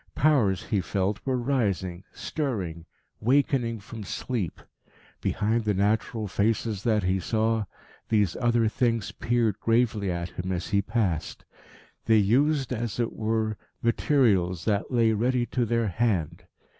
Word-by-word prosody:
Powers, 110 -11 +3
he 105 -5 0
felt, 95 +3 -1
were 130 -2 +1
rising, 100 -9 -1
stirring, 95 - -4 0.3
wakening 125 -2 +1
from 105 +2 -9
sleep. 105 -1 -3 0.6
Behind 110 +2 0
the 105 -2 0
natural 105 +2 0
faces 105 +1 0
that 105 -2 +1
he 95 +1 +1
saw, 110 +3 0 0.4
these 105 -6 +2
other 120 -2 +2
things 115 -3 0
peered 115 -3 0
gravely 115 -3 +1
at 85 0 -3
him 90 +2 -5
as 90 -1 -3
he 100 - +2
passed. 100 -7 -2 0.6
They 110 -1 +5
used, 135 +6 +2
as 120 -1 -3
it 120 -1 0
were, 110 -1 -1 0.3
materials 105 - +2
that 105 -2 0
lay 115 -3 +3
ready 120 +3 +1
to 125 -1 -1
their 115 -1 +1
hand. 95 -5 -1
110 Hz, 135 wpm, -27 LUFS, 100-120 Hz, 0.6 s, They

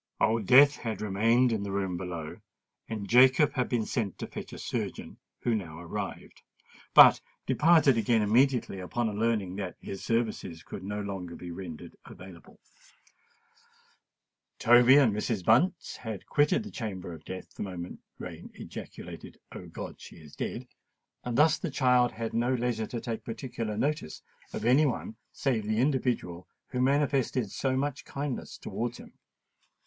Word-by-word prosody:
Old 110 -2 +1
Death 140 +3 +7
had 110 -2 -4
remained 115 +5 +2
in 110 -3 -1
the 100 -1 -4
room 95 -2 -1
below; 85 -3 -6 0.5
and 105 -3 -4
Jacob 130 +5 +5
had 125 -2 -1
been 115 -3 0
sent 105 -6 -2
to - - -5
fetch - - -8
a - - -8
surgeon, - - -5 0.2
who 120 - +1
now 85 -8 -4
arrived, 85 -1 -6 0.5
but - - +9 0.2
departed 150 -2 +4
again 110 0 +2
immediately 120 -1 +2
upon 110 +4 -2
learning 105 -5 0
that 95 -3 -4
his 95 - -7
services 110 -8 -2
could 95 - -8
no 105 +2 -3
longer 95 -4 -5
be 90 - -8
rendered 85 -3 -8
available. 90 -2 -13 2.0
Toby 120 +3 +7
and 130 -7 +5
Mrs. 105 -2 -2
Bunce 165 - +2
had 110 -5 -6
quitted 150 +9 +2
the 215 - -9
chamber 95 -6 -5
of 80 -1 -11
death 95 0 -8
the - - -9
moment 90 -3 -6 0.2
Rain - - -8
ejaculated, - - -9
"O - - -9
God! - - -8
she - - -11
is 75 -3 -14
dead;"—and 120 -1 -7
thus 155 +1 +5
the 175 - -3
child 125 -3 +3
had 115 0 -5
no 120 +3 +1
leisure 120 -3 -1
to 120 - -4
take 115 -1 -5
particular 115 -2 -5
notice 145 - -2 0.3
of - - -5
any 135 +6 +5
one 115 -3 -4 0.2
save 125 -6 -1
the 110 0 0
individual 120 - 0 0.2
who 125 - -2
manifested 135 -4 +1
so 130 -1 -1
much 145 0 -2
kindness 140 -2 -5
towards 120 +1 -4
him. - - -13
115 Hz, 155 wpm, -29 LUFS, 100-130 Hz, 2.0 s, but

